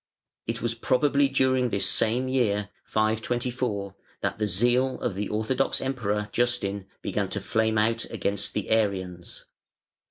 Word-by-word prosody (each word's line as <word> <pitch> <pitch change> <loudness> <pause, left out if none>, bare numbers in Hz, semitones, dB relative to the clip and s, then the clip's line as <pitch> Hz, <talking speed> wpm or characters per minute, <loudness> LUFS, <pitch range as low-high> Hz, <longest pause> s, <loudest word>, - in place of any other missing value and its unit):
It 115 0 -3
was 120 -1 +1
probably 140 +4 +2
during 130 -2 +2
this 100 - +1
same 120 +4 +1
year 105 -6 +1 0.2
524 110 -1 -1 0.3
that - - -2
the 105 - +1
zeal 120 +7 +2
of 110 - -1
the 100 +2 -3
orthodox 110 +5 +1
Emperor 105 -6 -1
Justin 100 -5 0 0.2
began - - -1
to - - -3
flame 110 0 +1
out 115 +2 +2
against 100 0 -3
the 105 - -2
Arians. 95 -5 -1
110 Hz, 135 wpm, -27 LUFS, 105-125 Hz, 0.3 s, probably